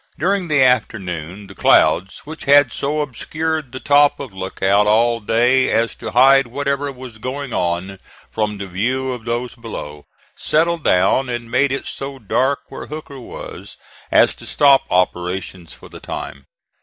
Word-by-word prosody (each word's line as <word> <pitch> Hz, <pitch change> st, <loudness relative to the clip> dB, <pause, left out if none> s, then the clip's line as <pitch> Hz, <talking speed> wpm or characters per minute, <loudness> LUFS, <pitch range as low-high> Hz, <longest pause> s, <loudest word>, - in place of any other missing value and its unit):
During 190 Hz, +2 st, 0 dB
the 150 Hz, -4 st, +3 dB
afternoon 100 Hz, -7 st, -1 dB
the -, -, -12 dB
clouds, 95 Hz, +5 st, +3 dB
which 160 Hz, +2 st, -9 dB
had 140 Hz, -3 st, +5 dB
so 150 Hz, +2 st, -1 dB
obscured 155 Hz, +2 st, -3 dB
the 130 Hz, -, -7 dB
top 145 Hz, +1 st, +3 dB
of 135 Hz, -7 st, -8 dB
Lookout 95 Hz, +2 st, +1 dB
all 115 Hz, +2 st, +3 dB
day 120 Hz, +4 st, +2 dB
as 115 Hz, 0 st, +1 dB
to -, -, -6 dB
hide 135 Hz, +1 st, +5 dB
whatever 140 Hz, +2 st, -2 dB
was 125 Hz, -4 st, -11 dB
going 130 Hz, +2 st, -5 dB
on 90 Hz, +2 st, -2 dB, 0.3 s
from 105 Hz, -1 st, -2 dB
the 100 Hz, -, -6 dB
view 125 Hz, +8 st, -2 dB
of 120 Hz, -2 st, -9 dB
those 120 Hz, +1 st, -3 dB
below, 75 Hz, -11 st, -8 dB, 0.3 s
settled 165 Hz, +1 st, 0 dB
down 95 Hz, +8 st, +2 dB
and 120 Hz, -1 st, -5 dB
made 140 Hz, -1 st, +2 dB
it 135 Hz, -, -3 dB
so 135 Hz, 0 st, -6 dB
dark 130 Hz, +4 st, 0 dB
where -, -, -8 dB
Hooker 150 Hz, -2 st, -8 dB
was 125 Hz, -, -10 dB, 0.3 s
as -, -, +5 dB
to -, -, -9 dB
stop 140 Hz, -2 st, +4 dB
operations 90 Hz, -1 st, -2 dB
for -, -, -12 dB
the -, -, -12 dB
time. 70 Hz, -1 st, -7 dB
125 Hz, 160 wpm, -19 LUFS, 100-140 Hz, 0.3 s, had